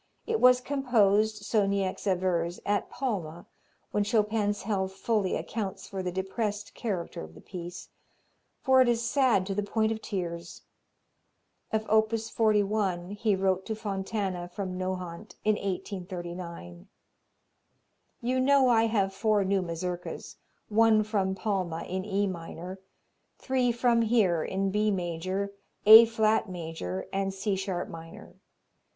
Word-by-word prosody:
It 450 -1 0
was 250 0 +6
composed, 220 -6 +2
so 210 -3 +2
Niecks 195 0 -1
avers, 180 -2 0
at 205 0 0
Palma, 180 - -4 0.5
when 210 - +1
Chopin's 210 -1 +1
health 190 -2 -1
fully 200 -1 0
accounts 205 -4 -4
for 195 -1 -4
the 180 -1 -2
depressed 205 +3 -3
character 190 -7 -4
of 80 +1 -10
the - - -12
piece, 175 -1 -8 0.7
for 260 -1 +5
it 255 - +4
is 235 0 +1
sad 250 -8 +3
to 195 - -2
the 205 - 0
point 220 +2 0
of 220 0 -3
tears. 170 -4 -5 1.1
Of 220 0 -1
op. 220 0 +4
41 210 -5 0
he 205 0 +1
wrote 190 0 +1
to 220 - -2
Fontana 195 -3 -3
from 185 +1 -5
Nohant 185 +1 -5
in 215 - +4
1839, 175 - -6 1.3
"You 255 +2 0
know 270 0 +4
I 225 -1 +4
have 200 -3 +1
four 210 0 +2
new 195 0 +1
Mazurkas, 175 +1 -5 0.3
one 220 0 +4
from 200 -3 0
Palma, 185 -5 -2
in 185 +1 -4
E 205 0 0
minor; 180 0 -6 0.6
three 255 -2 +1
from 235 0 +2
here, 210 -8 +2
in 195 0 -1
B 210 +1 +2
major, 185 +2 -2 0.3
A 220 +2 +11
flat 220 -2 +1
major 160 - -5
and 195 0 0
C 195 +1 -1
sharp 190 -2 -3
minor. 165 0 -11
200 Hz, 135 wpm, -28 LUFS, 185-220 Hz, 1.3 s, A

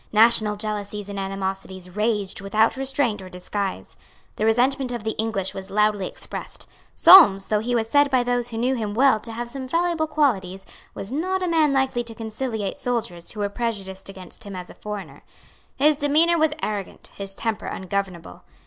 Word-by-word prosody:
National 220 -1 +5
jealousies 205 -1 -4
and 200 -1 -5
animosities 190 -1 -4
raged 210 -3 0
without 215 +3 +2
restraint 265 -5 -1
or 185 - -9
disguise. 190 +2 -4 0.4
The 215 - -1
resentment 250 +3 +2
of 240 -3 -4
the 220 - -1
English 215 -4 -1
was 190 0 -7
loudly 210 -1 +1
expressed. - - -6 0.3
Solmes, 200 - +8
though 210 - +2
he 240 +3 -1
was 225 -1 0
said 285 +4 +4
by 255 -2 +3
those 245 -1 0
who 225 - -5
knew 250 +3 +1
him 215 -5 -3
well 260 -2 +4
to 225 +2 -6
have 240 +2 -4
some 260 +2 -6
valuable 335 +2 0
qualities, 195 -12 0 0.3
was 195 - -6
not 370 +6 -1
a - - 0
man 320 -3 +3
likely 265 -3 +1
to 230 -1 -9
conciliate 220 0 -4
soldiers 230 -10 -3
who 210 - -4
were 205 - +1
prejudiced 200 -4 -4
against 185 -3 -7
him 200 -2 -8
as 180 -1 -7
a - - -12
foreigner. 210 -2 -7 0.5
His 295 +2 +3
demeanour 315 +4 +3
was 310 -1 +2
arrogant, 205 -3 -4
his 195 -1 -3
temper 225 -2 -3
ungovernable. 190 -2 -4
220 Hz, 180 wpm, -23 LUFS, 195-260 Hz, 0.5 s, Solmes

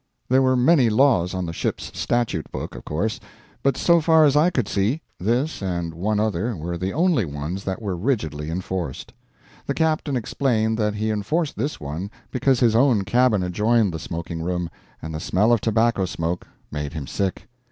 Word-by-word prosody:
There 130 +1 +5
were 130 0 +3
many 130 -1 +5
laws 110 -7 +3
on 90 -1 -2
the 85 - -5
ship's - - -3
statute 120 -9 -1
book - - -5
of - - -9
course; 110 - -2 0.4
but 140 -1 +1
so 170 -1 +4
far 160 0 +5
as 140 -1 +3
I 155 +4 +5
could 125 - -1
see, 110 +11 0 0.2
this 120 - 0
and 85 -3 -2
one 105 +6 -1
other 110 +2 0
were 85 +1 -4
the 90 +3 -2
only 165 - +2
ones 75 +5 -4
that 95 +4 -3
were 100 -3 -2
rigidly 80 - -2
enforced. 90 -4 -4 0.5
The - - -1
captain 155 -3 +1
explained 110 -2 0
that 105 -1 +1
he 110 +1 -1
enforced 140 - -1
this 140 +8 -3
one 80 +7 -5 0.2
because 130 0 +2
his 115 -3 +3
own 120 -4 +4
cabin 110 0 +3
adjoined 105 +2 +2
the 80 - -4
smoking 85 +1 -5
room, 90 0 -2 0.3
and 80 0 -5
the 80 - -3
smell 105 +7 +2
of 115 - +2
tobacco 110 -2 +2
smoke 85 0 -3 0.2
made 75 0 -4
him 75 -4 -5
sick. 95 +7 -3
105 Hz, 185 wpm, -23 LUFS, 85-125 Hz, 0.5 s, There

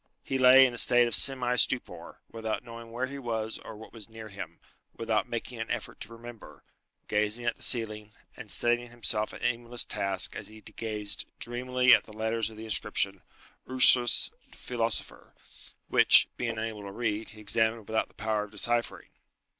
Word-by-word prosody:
He 135 - -2
lay 130 +1 +8
in 125 - -1
a 120 - +3
state 120 -1 +7
of 120 - -4
semi 125 -1 +3
stupor, 130 +1 -1
without 110 0 -4
knowing 115 -1 -11
where 120 +3 -2
he 140 +2 -8
was 110 -3 -4
or - - -10
what 110 - -13
was 115 -2 -7
near 110 -1 -10
him, 95 -5 -9 0.4
without 110 -3 -1
making 120 0 -5
an 115 - -5
effort 120 -3 -5
to - - -7
remember, 115 -1 -12 0.4
gazing 105 +3 0
at 120 - 0
the - - -17
ceiling, 110 -3 -2 0.2
and - - -11
setting 120 0 +1
himself 110 -2 -2
an - - -11
aimless 120 0 -1
task 95 -1 -1
as - - -6
he 110 0 -14
gazed 105 -3 -3
dreamily 125 +1 +2
at 110 - +4
the 110 - -14
letters 110 0 -1
of 110 - -14
the 110 - -8
inscription 100 -3 -1 0.5
"Ursus, 125 -2 +5 0.2
Philosopher" 115 -2 -4 0.5
which, - - +6
being 115 -2 -3
unable 110 -1 -4
to 100 -1 -8
read, 110 0 -3
he 110 - -13
examined 110 +1 0
without 110 0 -1
the - - -28
power 110 -1 -2
of - - -16
deciphering. 120 +3 -1
115 Hz, 180 wpm, -28 LUFS, 110-120 Hz, 0.5 s, lay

